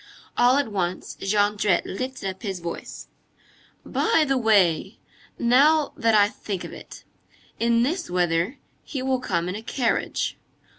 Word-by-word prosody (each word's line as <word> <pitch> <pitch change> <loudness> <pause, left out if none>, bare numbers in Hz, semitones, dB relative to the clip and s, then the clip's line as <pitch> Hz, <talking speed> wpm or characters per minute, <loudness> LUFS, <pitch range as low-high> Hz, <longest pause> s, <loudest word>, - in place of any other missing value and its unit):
All 245 +2 +4
at 285 -6 0
once, 185 -2 -3
Jondrette 205 -1 +2
lifted 255 +1 -4
up 190 0 -6
his 195 -5 -4
voice:— 170 0 -7 0.8
"By 435 -9 +2
the 270 - +2
way! 200 -5 +2 0.4
Now 285 +6 +4
that 225 -1 +2
I 205 -1 +6
think 200 -3 -6
of - - -8
it. - - -11 0.6
In 235 0 +3
this 340 +7 -2
weather, 175 - 0 0.3
he 270 -4 -5
will 260 -1 +1
come 175 -8 -1
in 180 - -3
a 210 - -6
carriage. 235 +1 -1
220 Hz, 145 wpm, -24 LUFS, 190-255 Hz, 0.8 s, I